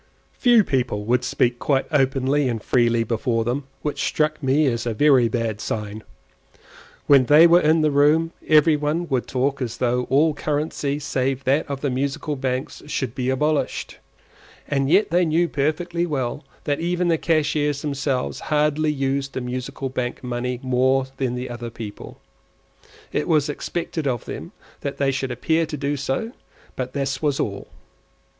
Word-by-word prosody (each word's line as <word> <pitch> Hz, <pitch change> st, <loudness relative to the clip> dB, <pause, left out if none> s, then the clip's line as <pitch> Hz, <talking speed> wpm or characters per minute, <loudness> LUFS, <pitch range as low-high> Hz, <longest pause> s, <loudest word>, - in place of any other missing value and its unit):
Few 240 Hz, -4 st, +4 dB
people 120 Hz, -, -1 dB
would 125 Hz, +2 st, +2 dB
speak 120 Hz, 0 st, 0 dB
quite 135 Hz, -1 st, +1 dB
openly 135 Hz, -1 st, +2 dB
and 115 Hz, -2 st, -2 dB
freely 115 Hz, 0 st, +2 dB
before 115 Hz, +1 st, 0 dB
them, 125 Hz, +4 st, -2 dB, 0.2 s
which 150 Hz, -, -2 dB
struck 155 Hz, 0 st, 0 dB
me 140 Hz, +3 st, +2 dB
as 120 Hz, -3 st, -1 dB
a 115 Hz, -, -1 dB
very 135 Hz, -2 st, +5 dB
bad 115 Hz, -3 st, -2 dB
sign. 105 Hz, 0 st, -4 dB, 1.0 s
When 140 Hz, -3 st, +6 dB
they 150 Hz, +5 st, +7 dB
were 170 Hz, +1 st, +6 dB
in 155 Hz, +1 st, +3 dB
the 155 Hz, -1 st, +2 dB
room 150 Hz, +3 st, +3 dB, 0.2 s
every 155 Hz, 0 st, +5 dB
one 150 Hz, +4 st, -1 dB
would 130 Hz, -3 st, 0 dB
talk 135 Hz, +2 st, -1 dB
as 120 Hz, -2 st, -3 dB
though 125 Hz, 0 st, 0 dB
all 150 Hz, +4 st, +4 dB
currency 145 Hz, -1 st, -2 dB
save 135 Hz, -2 st, -2 dB
that 140 Hz, +4 st, +1 dB
of 140 Hz, -1 st, -4 dB
the 140 Hz, -, 0 dB
Musical 140 Hz, +3 st, -2 dB
Banks 130 Hz, -1 st, -3 dB
should 130 Hz, -5 st, -2 dB
be 125 Hz, -1 st, -2 dB
abolished; 150 Hz, +3 st, -1 dB, 0.7 s
and 135 Hz, -1 st, 0 dB
yet 190 Hz, +4 st, +3 dB
they 175 Hz, +1 st, +3 dB
knew 170 Hz, +1 st, +2 dB
perfectly 170 Hz, +4 st, -1 dB
well 145 Hz, -1 st, -2 dB, 0.2 s
that 145 Hz, -1 st, -1 dB
even 175 Hz, +1 st, 0 dB
the 165 Hz, -2 st, +2 dB
cashiers 150 Hz, -3 st, 0 dB
themselves 140 Hz, -3 st, -2 dB
hardly 150 Hz, 0 st, +2 dB
used 135 Hz, -1 st, -2 dB
the -, -, -2 dB
Musical 130 Hz, +2 st, -4 dB
Bank 125 Hz, -1 st, -4 dB
money 125 Hz, 0 st, -3 dB
more 130 Hz, +1 st, +2 dB
than 125 Hz, -2 st, -1 dB
other 120 Hz, -1 st, -6 dB
people. 110 Hz, -3 st, -9 dB, 0.9 s
It -, -, -1 dB
was 150 Hz, -2 st, +2 dB
expected 160 Hz, 0 st, -3 dB
of 120 Hz, -3 st, -2 dB
them -, -, -7 dB, 0.3 s
that 140 Hz, -, -4 dB
they 140 Hz, -1 st, +1 dB
should 135 Hz, 0 st, -2 dB
appear 160 Hz, +7 st, 0 dB
to 150 Hz, -, -5 dB
do 145 Hz, +1 st, -1 dB
so, 140 Hz, -, -2 dB, 0.4 s
but 130 Hz, 0 st, -4 dB
this 135 Hz, -1 st, -2 dB
was 145 Hz, -3 st, 0 dB
all. 100 Hz, -1 st, -3 dB
140 Hz, 165 wpm, -22 LUFS, 125-150 Hz, 1.0 s, they